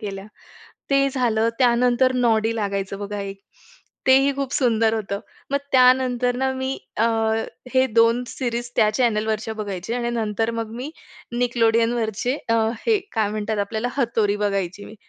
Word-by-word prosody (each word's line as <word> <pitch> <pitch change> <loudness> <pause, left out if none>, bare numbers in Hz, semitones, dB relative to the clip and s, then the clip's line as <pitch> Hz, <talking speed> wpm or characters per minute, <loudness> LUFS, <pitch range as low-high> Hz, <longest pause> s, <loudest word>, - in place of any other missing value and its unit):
केल्या. 195 -2 -6 0.6
ते 275 0 +4
झालं, 230 -4 +1
त्यानंतर 250 +1 +3
नॉडी 230 -2 +2
लागायचं 200 -2 -2
बघा 205 0 -5
एक. 195 0 -6 0.7
तेही 270 +1 +5
खूप 275 -1 -3
सुंदर 225 -3 +2
होतं. 200 -2 -3 0.3
मग 280 - +2
त्यानंतर 250 -1 +4
ना 265 +1 0
मी 260 +1 -3 0.2
अ, 225 - +2 0.7
हे 260 0 +4
2 230 +1 +3
सिरीज 240 -2 -3
त्या 215 - +4
चॅनेलवरच्या 220 -2 0
बघायचे 205 0 -4
आणि 240 -1 -1
नंतर 225 -1 -1
मग 230 -1 -4
मी 255 +5 -5 0.5
Nickelodeonवरचे 230 0 +1
अ, 230 - +3 0.3
हे 445 -2 +4
काय 220 -3 +1
म्हणतात 215 0 -2
आपल्याला, 220 +4 -2
हतोरी 225 -6 +1
बघायची 200 -1 -2
मी. - - -11
230 Hz, 145 wpm, -22 LUFS, 215-250 Hz, 0.7 s, तेही